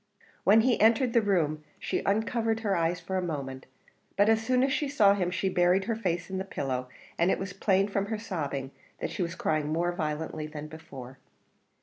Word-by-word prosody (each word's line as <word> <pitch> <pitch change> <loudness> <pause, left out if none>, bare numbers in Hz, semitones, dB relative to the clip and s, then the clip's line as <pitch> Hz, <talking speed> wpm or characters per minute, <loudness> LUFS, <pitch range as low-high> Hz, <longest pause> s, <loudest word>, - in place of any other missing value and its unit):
When 215 +3 +6
he 245 +1 +2
entered 230 +3 +4
the 235 - +5
room 160 -7 0
she - - -2
uncovered 225 +2 +1
her 205 -3 +1
eyes 170 +1 0
for 185 +2 -3
a - - +1
moment; 140 -6 -5 0.5
but 205 +2 +5
as 225 0 +4
soon 255 +2 +2
as 270 +1 +2
she 300 -1 0
saw 210 -8 +5
him 185 -3 0
she 185 +2 -1
buried 180 +1 +3
her 230 - -1
face 180 -6 -2
in 190 0 -4
the - - -2
pillow, 130 -8 -3 0.3
and 170 +2 +4
it - - +2
was 190 -1 -5
plain 195 0 +2
from 200 -1 -1
her 220 +1 -2
sobbing 145 -11 -4 0.3
that - - -3
she - - -4
was 170 0 -2
crying 155 -4 0
more 170 +2 +1
violently 155 -1 -3
than 150 -1 -7
before. 135 -5 -10
185 Hz, 210 wpm, -28 LUFS, 155-215 Hz, 0.5 s, When